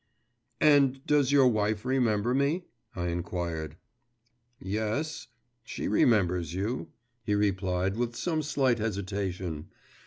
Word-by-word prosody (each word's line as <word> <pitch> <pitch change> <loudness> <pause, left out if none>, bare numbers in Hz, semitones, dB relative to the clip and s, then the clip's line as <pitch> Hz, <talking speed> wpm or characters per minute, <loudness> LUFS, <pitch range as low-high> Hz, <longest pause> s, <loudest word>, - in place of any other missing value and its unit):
'And 140 -3 +4
does 145 -3 +3
your 140 -2 +6
wife 110 -1 0
remember 120 -3 +1
me?' 140 +7 +1 0.3
I 90 -1 -2
inquired. 85 -2 -4 0.8
'Yes, 110 - -3 0.4
she - - -5
remembers 90 -6 +2
you,' 105 +7 -2 0.4
he 105 -2 0
replied, 95 -2 0
with 120 0 -2
some 160 +3 -1
slight 135 -5 +1
hesitation. 95 -6 -3
105 Hz, 105 wpm, -28 LUFS, 95-130 Hz, 0.8 s, your